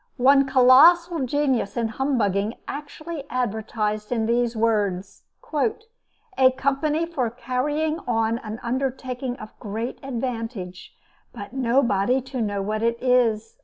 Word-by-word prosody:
One 275 +2 +5
colossal 295 +5 +5
genius 265 -6 0
in 230 -1 0
humbugging 220 -4 0
actually 300 +1 -6
advertised 215 -3 -2
in 225 -2 0
these 235 +1 +1
words: 205 -4 -1 0.3
"A 430 - -1
company 295 +4 0
for 275 -8 -2
carrying 295 +6 -2
on 225 -1 +1
an 220 0 -7
undertaking 255 0 -3
of 215 -4 -10
great 225 +3 -5
advantage, 230 -8 -5 0.4
but - - -9
nobody 245 -2 +2
to 260 -1 -5
know 205 -2 -1
what 215 +2 -2
it 230 0 +1
is." 230 -3 +1
250 Hz, 120 wpm, -24 LUFS, 220-275 Hz, 0.4 s, One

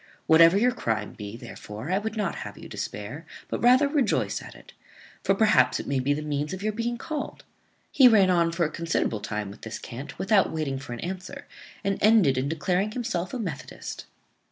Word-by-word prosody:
Whatever 165 +3 +7
your 245 +4 +4
crime 115 - -2
be, 105 +2 -8
therefore 110 +5 -8
I 190 - +2
would 220 +1 -4
not 205 -4 -1
have - - -7
you - - -10
despair, 105 +10 -6 0.3
but - - -3
rather 255 +4 +6
rejoice 280 -5 0
at - - -11
it; - - -16 0.5
for 195 - +3
perhaps 220 +1 +4
it - - -5
may 140 -1 0
be 130 +3 0
the 150 +1 -1
means 150 +2 -2
of 190 +1 -6
your 215 0 0
being 235 +2 -2
called." 300 +4 -5 0.5
He 265 - +7
ran 200 -6 +5
on 170 -2 +3
for 170 0 +1
a 155 - -3
considerable 165 -9 -1
time 105 -1 -4
with 100 - -14
this 115 - -6
cant, 130 +5 -8
without 195 0 +3
waiting 150 -4 -2
for 130 -2 -7
an 120 - -7
answer, 185 +1 -6 0.4
and 195 0 -1
ended 210 -11 +5
in 130 +2 -1
declaring 180 +6 0
himself 225 -8 -2
a - - -3
methodist. 170 - -6
170 Hz, 205 wpm, -26 LUFS, 135-215 Hz, 0.5 s, Whatever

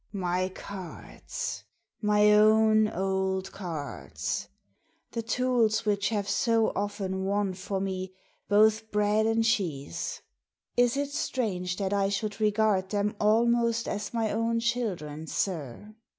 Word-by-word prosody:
" - - -44 0.2
My 185 +1 0
cards! 195 - -7 0.4
My 210 0 +4
own 215 0 +5
old 190 -1 -1
cards! 145 - -4 0.6
The 230 - -2
tools 230 -2 +1
which 205 -1 +1
have 205 -3 -1
so 225 +2 +2
often 195 -2 -2
won 200 0 0
for 195 +1 -4
me 190 -1 -3 0.4
both 215 +1 +4
bread 210 +1 +2
and 225 0 +2
cheese 180 - -1 0.5
1 245 - +5
Is 245 +3 -1
it 285 0 -1
strange 185 -10 -2
that 195 -1 -1
I 195 -1 +2
should 205 +1 -3
regard 210 -3 +2
them 205 +1 0
almost 230 +2 +3
as 205 0 -3
my 225 -2 0
own 230 +1 0
children, 185 -11 -2
sir? 170 - -3
210 Hz, 130 wpm, -28 LUFS, 190-225 Hz, 0.6 s, own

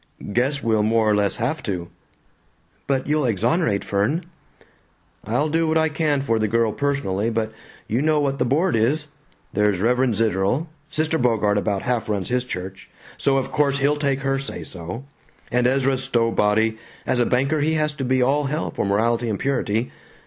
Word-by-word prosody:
"Guess 135 +5 0
we'll 110 -2 +2
more 110 +1 +2
or 105 - +4
less 100 -1 +1
have 125 +8 -2
to." 90 -5 -4 1.0
"But 135 -2 0
you'll 150 -1 +1
exonerate 115 - +1
Fern?" 110 - 0 1.0
"I'll 125 +8 +1
do 165 +1 +1
what 160 0 +2
I 160 0 +3
can 150 -2 0
for 115 -5 0
the 110 - +1
girl 115 +1 +2
personally, 115 -8 -1
but 110 -1 -1 0.4
you 115 +5 0
know 155 0 +2
what 140 -1 -1
the - - +3
board 155 +8 +1
is. 145 +7 +1 0.4
There's 105 -3 +2
Reverend 125 +2 +2
Zitterel; 110 - +1 0.2
Sister 155 +1 -1
Bogart 105 -4 +2
about 100 -1 -1
half 120 -3 -1
runs 100 -3 -2
his 125 0 0
church, 95 -4 -7 0.3
so 135 -1 +1
of 135 - -2
course 140 -2 +2
he'll 140 +2 +2
take 140 -2 0
her 135 0 0
say 135 - -6
so; 90 +8 -7 0.5
and 125 0 +3
Ezra 135 0 +2
Stowbody, 115 -3 +2 0.3
as 125 - 0
a 120 - +3
banker 140 +4 +1
he 160 +2 +1
has 150 -1 0
to 135 - -3
be 130 0 +2
all 145 +3 +2
hell 150 +4 -2
for - - -2
morality 115 +4 +1
and 105 - -1
purity. 120 -3 -1
125 Hz, 180 wpm, -22 LUFS, 110-140 Hz, 1.0 s, or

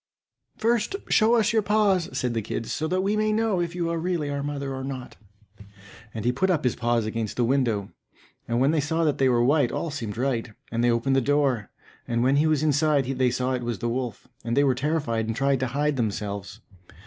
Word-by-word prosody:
"First 230 - +1
show 225 +2 +4
us 230 0 +2
your 220 - +4
paws," 200 -4 +2
said 125 -2 -1
the 115 - -1
kids, 110 +2 -4
"so 155 - -1
that 185 +3 0
we 200 +2 +1
may 215 0 +1
know 215 -4 +1
if 170 0 -3
you 170 -1 -1
are 165 - -1
really 165 -4 -1
our 140 0 -2
mother 140 -1 -3
or 130 0 -5
not." 130 -2 -6 1.0
And 110 0 -6
he 120 - +3
put 190 +10 0
up 165 -5 +1
his 125 - +1
paws 120 -2 0
against 110 -1 -3
the 125 - +2
window, 115 -6 0 0.6
and 120 +1 0
when 135 +3 +3
they 160 - +1
saw 160 +3 0
that 150 -3 +1
they 135 -1 +4
were 120 -1 +3
white, 140 -2 +3
all 165 - -3
seemed 115 -7 -5
right, 120 -3 -1 0.2
and 115 +1 0
they 120 - +4
opened 120 +3 +1
the 135 - +3
door; 135 -5 +1 0.4
and 120 0 0
when 135 +2 +3
he 155 +2 +3
was 155 -1 +2
inside 150 -2 +2
they 130 -1 +1
saw 125 +1 -1
it 125 - -2
was 120 -2 -3
the 120 - -3
wolf, 120 -3 -4 0.2
and 115 +2 -2
they 140 - +5
were 135 -2 +3
terrified 130 -5 -1
and 115 - -2
tried 140 +1 +1
to 130 - 0
hide 145 +3 0
themselves. 105 -2 -3
135 Hz, 230 wpm, -25 LUFS, 120-160 Hz, 1.0 s, they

